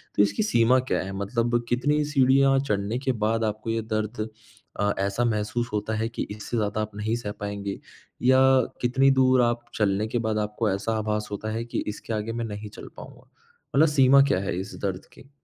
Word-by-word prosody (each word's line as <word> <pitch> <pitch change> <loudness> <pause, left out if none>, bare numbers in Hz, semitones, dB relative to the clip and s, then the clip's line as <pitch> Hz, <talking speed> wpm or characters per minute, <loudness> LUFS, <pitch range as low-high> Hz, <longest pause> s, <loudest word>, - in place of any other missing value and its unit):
तो 105 - +5
इसकी 100 - 0
सीमा 125 - +4
क्या 130 - -1
है? 95 - -6
मतलब 120 +4 0
कितनी 145 +5 +1
सीढ़ियाँ 135 -1 +4
चढ़ने 105 -3 -1
के 130 -1 0
बाद 115 +1 +1
आपको 110 +1 -3
ये 115 0 0
दर्द 110 0 -3 0.5
अ, 100 0 +2
ऐसा 100 +4 0
महसूस 115 +2 -1
होता 105 +1 -1
है 110 +1 0
कि 115 - -4
इससे 105 +3 -4
ज़्यादा 105 0 -1
आप 110 - -4
नहीं 110 +2 -1
सह 105 -3 -5
पाएँगे 100 -1 -4 0.4
या 130 +1 +5 0.4
कितनी 135 +3 +3
दूर 130 -1 +4
आप 120 0 +1
चलने 105 0 +1
के 120 - -2
बाद 110 -1 0
आपको 105 +1 -1
ऐसा 105 +3 -1
आभास 105 0 -2
होता 110 +2 -4
है 115 +1 -2
कि 120 - -3
इसके 105 +2 -5
आगे 110 +1 -2
मैं 115 0 -3
नहीं 105 0 -6
चल - - -11
पाऊँगा? - - -12 0.5
मतलब 155 +4 +6
सीमा 140 -1 +6
क्या 95 - +2
है, 95 -2 -2
इस 95 - -7
दर्द 95 -2 -3
की? 135 - -17
110 Hz, 200 wpm, -25 LUFS, 105-125 Hz, 0.5 s, मतलब